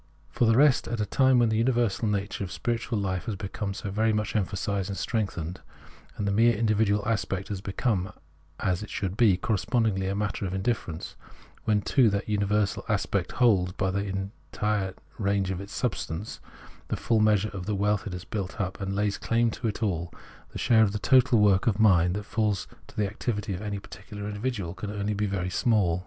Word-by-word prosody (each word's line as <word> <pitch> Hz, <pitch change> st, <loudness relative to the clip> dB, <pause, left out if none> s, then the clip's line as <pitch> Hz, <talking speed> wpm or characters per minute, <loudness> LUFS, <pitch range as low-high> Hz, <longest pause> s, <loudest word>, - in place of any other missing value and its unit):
For 120 Hz, -, +2 dB
the 115 Hz, 0 st, +4 dB
rest, 140 Hz, -2 st, +5 dB
at 120 Hz, -, -3 dB
a 105 Hz, -, +1 dB
time 130 Hz, +4 st, +4 dB
when 120 Hz, -2 st, +4 dB
the 110 Hz, -, +1 dB
universal 120 Hz, -3 st, +1 dB
nature 100 Hz, -1 st, -1 dB
of 95 Hz, -, -6 dB
spiritual 115 Hz, -1 st, -2 dB
life 95 Hz, -3 st, -2 dB
has 110 Hz, -, -2 dB
become 100 Hz, 0 st, -4 dB
so 100 Hz, -, -5 dB
very 110 Hz, +3 st, +2 dB
much 105 Hz, +1 st, -1 dB
emphasised 100 Hz, -1 st, -1 dB
and 100 Hz, -, -4 dB
strengthened, 95 Hz, -6 st, -2 dB, 0.6 s
and 100 Hz, -, -2 dB
the -, -, +2 dB
mere 115 Hz, +3 st, +4 dB
individual 105 Hz, -1 st, +2 dB
aspect 100 Hz, -3 st, -1 dB
has 100 Hz, -3 st, -4 dB
become, 100 Hz, -1 st, -1 dB, 0.5 s
as 90 Hz, -2 st, 0 dB
it 105 Hz, -, -7 dB
should 95 Hz, -2 st, -3 dB
be, 110 Hz, -5 st, +4 dB
correspondingly 105 Hz, -1 st, 0 dB
a 100 Hz, -, -1 dB
matter 105 Hz, -1 st, -2 dB
of 90 Hz, -, -4 dB
indiilerence, 95 Hz, -5 st, -2 dB, 0.5 s
when, 105 Hz, -2 st, +2 dB
too, 130 Hz, -6 st, +4 dB
that 100 Hz, 0 st, -2 dB
universal 105 Hz, -1 st, +1 dB
aspect -, -, 0 dB
holds, 95 Hz, -8 st, +3 dB
by 95 Hz, 0 st, 0 dB
the 100 Hz, +2 st, -1 dB, 0.4 s
entire 105 Hz, -3 st, -1 dB, 0.2 s
range 100 Hz, -2 st, +1 dB
of 95 Hz, 0 st, -3 dB
its 100 Hz, -, -9 dB
substance, 105 Hz, -6 st, -3 dB, 0.5 s
the -, -, -2 dB
full 115 Hz, -2 st, +1 dB
measure 105 Hz, -1 st, +3 dB
of 95 Hz, -3 st, -7 dB
the 105 Hz, -, 0 dB
wealth 105 Hz, +1 st, 0 dB
it 95 Hz, -, -5 dB
has 90 Hz, -1 st, -6 dB
built 100 Hz, 0 st, -4 dB
up, 95 Hz, 0 st, -3 dB
and 95 Hz, 0 st, -2 dB
lays 100 Hz, 0 st, 0 dB
claim 115 Hz, 0 st, +1 dB
to 115 Hz, -, -3 dB
it 110 Hz, +2 st, -3 dB
all, 85 Hz, -5 st, -1 dB, 0.4 s
the -, -, -8 dB
share 110 Hz, -2 st, +4 dB
in 105 Hz, -, +3 dB
the 105 Hz, -, -3 dB
total 125 Hz, +2 st, +4 dB
work 100 Hz, -1 st, +4 dB
of 105 Hz, -3 st, +2 dB
mind 90 Hz, -5 st, +5 dB
that 105 Hz, -, -3 dB
falls 105 Hz, -4 st, 0 dB, 0.2 s
to -, -, -17 dB
the 105 Hz, -, +2 dB
activity 105 Hz, 0 st, -3 dB
of 90 Hz, -, -5 dB
any 105 Hz, -1 st, -3 dB
particular 100 Hz, +1 st, -8 dB
individual 105 Hz, -4 st, -3 dB
can 95 Hz, +2 st, -6 dB
only 105 Hz, 0 st, -2 dB
be 105 Hz, +1 st, 0 dB
very 90 Hz, -2 st, -2 dB
small. 95 Hz, -6 st, +2 dB
105 Hz, 205 wpm, -27 LUFS, 95-110 Hz, 0.6 s, rest